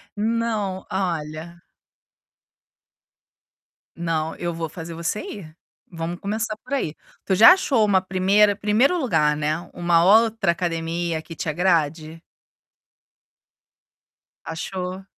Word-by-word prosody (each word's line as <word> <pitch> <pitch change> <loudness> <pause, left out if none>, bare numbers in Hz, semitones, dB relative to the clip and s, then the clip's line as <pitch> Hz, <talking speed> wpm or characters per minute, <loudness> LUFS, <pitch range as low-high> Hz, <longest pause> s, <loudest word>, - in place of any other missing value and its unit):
Não, 215 -3 -2
olha 170 -2 -4 2.3
Não, 160 -2 -2
eu 175 -1 -3
vou 165 0 -4
fazer 165 +1 -8
você 170 +5 -3
ir, 160 -6 -9 0.4
vamos 170 +1 -5
começar 215 +2 -3
por 270 - -7
aí. 160 - -1 0.3
Tu 190 - +1
já 225 - +9
achou 265 - +1
uma 190 -2 +3
primeira 195 +2 +3
primeiro 220 - +2
lugar, 155 - +1
né, 155 +2 -1
uma 170 -1 +2
outra 220 -1 +4
academia 165 -1 -2
que 165 0 -11
te 155 - -5
agrade? 160 -1 0 2.2
Achou? 180 +3 -5
175 Hz, 105 wpm, -23 LUFS, 165-205 Hz, 2.3 s, já